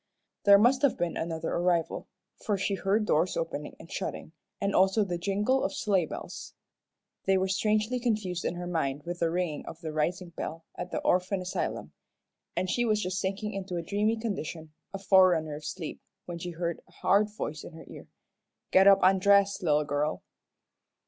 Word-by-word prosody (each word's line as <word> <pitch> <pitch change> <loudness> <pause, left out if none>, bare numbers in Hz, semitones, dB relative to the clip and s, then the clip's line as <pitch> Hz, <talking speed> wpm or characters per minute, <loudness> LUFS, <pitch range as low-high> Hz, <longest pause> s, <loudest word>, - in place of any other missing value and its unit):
There 200 0 +9
must 245 +5 +4
have 280 -3 +3
been 175 -1 -1
another 165 -1 -3
arrival, 175 -2 0 0.4
for 205 -2 0
she 195 +1 -1
heard 200 +2 +1
doors 165 -1 +1
opening - - -4
and - - -13
shutting, - - -4 0.3
and 200 -1 0
also 190 +3 +4
the 175 -3 -3
jingle 205 +8 +1
of - - -2
sleigh 190 -6 +1
bells. - - -8 0.7
They 195 0 +4
were 190 0 +1
strangely 215 +5 +1
confused 210 -7 -1
in - - -1
her 175 0 -5
mind 145 -5 -2
with 175 +2 -5
the 170 - +2
ringing 170 -3 -2
of 165 - -8
the 160 -2 -5
rising 175 +4 -1
bell 165 -1 -6
at 180 - -6
the - - -3
orphan 185 +2 +1
asylum, 180 0 -3 0.6
and 185 - 0
she 240 +6 +1
was 215 -3 +2
just 185 +1 -2
sinking 200 +2 -2
into 195 -2 -4
a 170 - -2
dreamy 210 +5 0
condition, 170 -8 -5 0.2
a 195 - -4
forerunner 185 -5 +4
of 150 +1 -8
sleep, 155 +1 -6 0.2
when 175 -1 -6
she 175 - -5
heard 170 0 -3
a - - -23
hard 205 +2 +2
voice 155 -8 -5
in - - -10
her 160 - -11
ear. - - -11 0.6
"Get 190 +1 +6
up 195 -1 +7
an' 190 +1 +5
dress, 200 +1 +4
little 150 -4 +2
girl." 145 +1 -1
185 Hz, 190 wpm, -29 LUFS, 170-200 Hz, 0.7 s, There